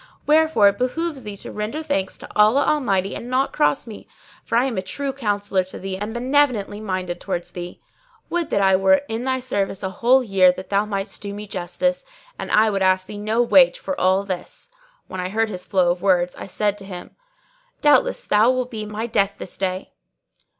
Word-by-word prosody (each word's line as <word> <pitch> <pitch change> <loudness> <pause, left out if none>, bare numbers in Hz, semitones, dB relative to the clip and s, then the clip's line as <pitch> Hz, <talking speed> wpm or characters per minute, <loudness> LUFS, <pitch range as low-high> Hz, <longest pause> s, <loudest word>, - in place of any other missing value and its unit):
Wherefore 310 -8 +4
it 200 - -5
behoveth 285 +2 -2
thee 205 -2 -7
to - - -8
render 215 +9 -4
thanks 195 -11 -2
to - - -11
Allah 215 +7 +4
Almighty 195 -10 +1
and 240 - -7
not 260 +2 0
cross 150 +5 +1
me, 220 -3 -11 0.4
for 230 - 0
I 245 - +3
am 260 -4 -2
a 190 - -1
true 275 +8 -3
counsellor 205 -6 0
to 185 - -10
thee 190 0 -5
and 205 +3 -5
benevolently 240 -4 +1
minded 185 -4 -3
towards 175 -3 -4
thee. 175 0 -8 0.5
Would 340 -2 -2
that 200 - +1
I 190 -1 +5
were 190 +5 +3
in 225 +3 -4
thy 260 0 0
service 205 -6 -2
a 190 - -2
whole 250 +7 +3
year 190 -5 +4
that 185 - -9
thou 200 +1 +2
mightest 195 -1 -4
do 200 -1 -6
me 210 +1 -7
justice; 200 +8 -2 0.4
and - - -5
I 215 0 +4
would 195 -1 -1
ask 185 0 +3
thee 205 +1 -8
no 220 +3 +1
wage 260 +2 +5
for 285 - -4
all 190 +2 +3
this." 185 - -6 0.4
When 185 - -6
I 180 - -3
heard 220 +2 0
his 180 -3 -6
flow 180 -3 +3
of 175 0 -4
words, 180 -2 +2
I - - -8
said 205 +1 -1
to 195 - -11
him, 180 -2 -9 0.7
"Doubtless - - +3
thou 215 - +3
wilt 255 0 -1
be 215 -2 -5
my 215 +2 -4
death 200 -3 0
this - - -8
day!" 185 0 -3
205 Hz, 210 wpm, -22 LUFS, 190-250 Hz, 0.7 s, I